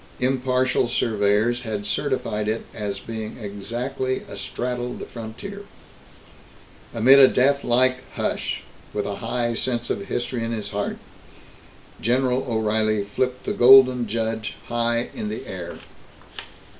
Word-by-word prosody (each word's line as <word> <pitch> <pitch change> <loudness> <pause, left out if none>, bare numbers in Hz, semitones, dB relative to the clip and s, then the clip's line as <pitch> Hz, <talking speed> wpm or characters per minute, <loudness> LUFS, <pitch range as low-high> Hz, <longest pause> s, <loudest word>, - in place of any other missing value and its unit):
Impartial 130 -1 +1
surveyors 110 +1 +1
had 110 -4 -4
certified 105 0 -1
it 110 +1 -2
as 100 -2 -3
being 110 0 -6
exactly 120 +5 -3
astraddle 125 0 -4
the - - -6
frontier. 120 - -8 1.3
Amid 130 +4 +6
a 135 - +10
deathlike 130 -1 +3 0.2
hush, - - -2 0.3
with 105 - -1
a 100 -1 -3
high 120 -1 -1
sense 120 0 -1
of 100 - -3
history 120 -1 -2
in 115 - -2
his 105 -2 -4
heart, 100 0 -2 1.0
General 125 +2 +1
O'Reilly 110 -1 +1
flipped 125 +5 -2
the - - -2
Golden 125 -1 +7
Judge 110 0 -2
high 120 0 0
in 105 - -4
the 110 - -5
air. - - -6
120 Hz, 120 wpm, -23 LUFS, 110-125 Hz, 1.3 s, a